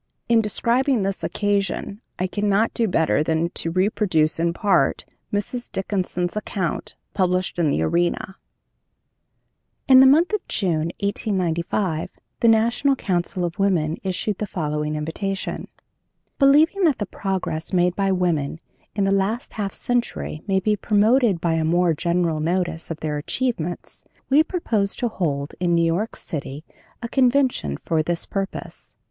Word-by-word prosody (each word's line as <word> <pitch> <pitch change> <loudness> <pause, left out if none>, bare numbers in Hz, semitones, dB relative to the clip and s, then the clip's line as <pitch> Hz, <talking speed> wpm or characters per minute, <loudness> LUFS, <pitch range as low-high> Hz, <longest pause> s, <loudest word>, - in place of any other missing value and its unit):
In 230 -1 +4
describing 235 +3 +1
this 195 0 -3
occasion 205 0 -1 0.2
I 185 - 0
cannot 205 +3 +1
do 230 - +1
better 160 -5 +2
than 160 +2 0
to 165 - -4
reproduce, 185 -4 +1
in 170 0 +2
part, 195 +3 +1 0.3
Mrs. 225 +4 -3
Dickinson's 185 -2 -2
account, 195 -5 -3 0.2
published 185 -2 0
in 160 -3 +3
The 80 - +1
Arena: 175 - 0 1.5
"In 260 -1 +8
the 265 - +8
month 325 +9 +4
of 425 - +1
June, 170 -4 0
1895, 185 -4 -1 0.3
the 235 - +3
National 235 +5 +3
Council 180 -4 -1
of 175 +3 -5
Women 170 -5 +1
issued 190 +2 -2
the 210 - -2
following 150 -4 -2
invitation: 185 +6 -3 0.7
"'Believing 310 +8 +5
that 305 -5 +3
the 205 - -2
progress 185 -5 -3
made 180 -1 +2
by 195 -1 +1
women 165 -5 0 0.4
in 200 - +1
the 195 - +2
last 195 +5 -1
half 200 -2 -3
century 240 -11 -2
may 190 -1 +2
be 210 +2 +1
promoted 215 0 +3
by 165 -1 0
a 160 0 +1
more 170 +1 +2
general 170 0 0
notice 170 0 -1
of 165 -1 -6
their 150 -1 -2
achievements, 175 - -3 0.3
we 290 +3 +7
propose 230 - -1
to 240 - -1
hold, 145 -8 -2
in 175 -1 +2
New 170 0 +3
York 180 +7 -1
city, 145 -1 -6 0.4
a - - -2
convention 250 - +2
for 160 -2 +1
this 170 +2 -2
purpose. 195 -1 -5
190 Hz, 145 wpm, -22 LUFS, 165-215 Hz, 1.5 s, In